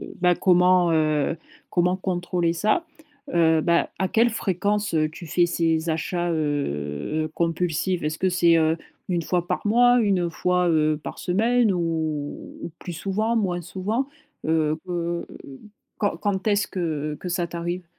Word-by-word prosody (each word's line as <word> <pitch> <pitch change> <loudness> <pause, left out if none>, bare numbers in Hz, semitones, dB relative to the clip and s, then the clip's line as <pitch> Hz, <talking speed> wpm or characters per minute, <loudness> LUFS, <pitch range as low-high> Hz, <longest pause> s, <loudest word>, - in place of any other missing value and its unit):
heu - - -8
bah, 180 -1 +4
comment, 180 -1 +4
heu, 155 0 +1 0.3
comment 180 +1 +2
contrôler 175 -2 -1
ça. 215 - +1 0.5
Heu 160 -2 +4
bah, 170 +1 +2
à 190 - +1
quelle 230 +4 +3
fréquence, 205 -1 -1
heu, 155 -1 +2
tu 170 +1 -10
fais 175 +2 +2
ces 165 -1 0
achats 175 +2 -1
heu 145 - -2
heu, - - -3
compulsifs? 170 +1 0
Est-ce 155 +1 -2
que 190 - +2
c'est, 170 -2 +4
heu, 160 0 +3 0.3
1 175 -1 +1
fois 175 +1 -1
par - - -2
mois, 245 +3 +5
1 185 -6 +1
fois, 180 +2 +1
heu, 155 -2 +2
par - - -7
semaine 225 +4 +2
ou 160 -4 -3
ou - - -5
plus 175 - -7
souvent? 210 +7 -1
Moins 180 -5 0
souvent? 205 - -2 0.4
Heu 155 -1 +2
heu, 170 -1 -2 0.7
quand 205 -5 0
quand 195 0 -2
est-ce 210 0 +2
que 155 -5 -3
que 180 - -6
ça 175 0 0
t'arrive? 175 +1 -4
175 Hz, 160 wpm, -24 LUFS, 160-190 Hz, 0.7 s, mois